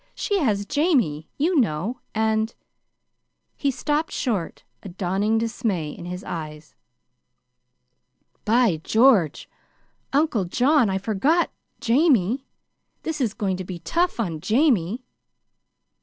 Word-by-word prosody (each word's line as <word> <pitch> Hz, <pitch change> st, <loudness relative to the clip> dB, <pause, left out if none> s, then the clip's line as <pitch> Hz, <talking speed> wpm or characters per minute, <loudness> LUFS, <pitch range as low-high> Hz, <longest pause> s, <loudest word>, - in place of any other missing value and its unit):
She 405 Hz, -1 st, 0 dB
has 210 Hz, -, +1 dB
Jamie, 260 Hz, -, +1 dB
you 325 Hz, +2 st, +2 dB
know, 215 Hz, -, -1 dB, 0.2 s
and 220 Hz, 0 st, +1 dB, 0.5 s
" -, -, -53 dB
He 280 Hz, -, +2 dB
stopped 295 Hz, +4 st, -1 dB
short, 210 Hz, -, -2 dB, 0.2 s
a 195 Hz, -, -8 dB
dawning 195 Hz, +4 st, 0 dB
dismay 220 Hz, -, -1 dB
in 170 Hz, -, -9 dB
his 180 Hz, +2 st, -6 dB
eyes. 155 Hz, -2 st, -7 dB, 1.7 s
"By 225 Hz, -5 st, +3 dB
George! 220 Hz, -, +3 dB, 0.6 s
Uncle 275 Hz, -, +2 dB
John, 255 Hz, -, +3 dB
I 190 Hz, -, 0 dB
forgot 230 Hz, -, +1 dB, 0.3 s
Jamie. 255 Hz, -, +2 dB, 0.6 s
This 320 Hz, -3 st, -3 dB
is 225 Hz, -5 st, 0 dB
going 195 Hz, -4 st, -1 dB
to 185 Hz, -, -5 dB
be 180 Hz, -1 st, -6 dB
tough 335 Hz, -, -1 dB
on 170 Hz, -8 st, -2 dB
Jamie!" 230 Hz, -, +2 dB
220 Hz, 115 wpm, -23 LUFS, 180-270 Hz, 1.7 s, By